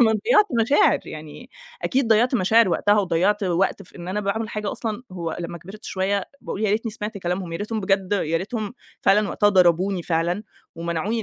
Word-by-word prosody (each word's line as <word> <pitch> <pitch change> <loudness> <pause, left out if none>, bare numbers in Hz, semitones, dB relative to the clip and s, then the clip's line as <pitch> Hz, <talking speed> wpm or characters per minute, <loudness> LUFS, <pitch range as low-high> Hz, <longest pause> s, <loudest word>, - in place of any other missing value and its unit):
أنا 220 -2 +5
ضيعت 420 - +4
مشاعر 275 +6 +4
يعني، 155 - -9 0.3
أكيد 265 -2 +1
ضيعت 235 +4 +4
مشاعر 220 +1 +4
وقتها، 205 +4 +3
وضيعت 190 +3 +1
وقت 185 0 0
في - - -16
إن 175 0 -8
أنا 210 +3 -1
باعمل 215 +2 -2
حاجة 210 -1 -3
أصلًا 225 0 -4
هو 170 -3 -4
لمّا 170 0 -5
كبرت 195 +5 -12
شوية، 195 +1 -1 0.2
بأقول 200 - -5
يا 205 - +2
ريتني 225 +2 0
سمعت 210 0 -5
كلامهم، 180 -1 -3
يا 165 - -2
ريتهم 215 +1 -3
بجد، 195 0 0
يا 165 -5 +1
ريتهم 215 +5 -4 0.3
فعلًا 210 +1 +4
وقتها 205 - +2
ضربوني 185 0 +3
فعلًا 170 +4 0 0.3
ومنعوني 170 +7 -2
200 Hz, 185 wpm, -23 LUFS, 175-215 Hz, 0.3 s, أنا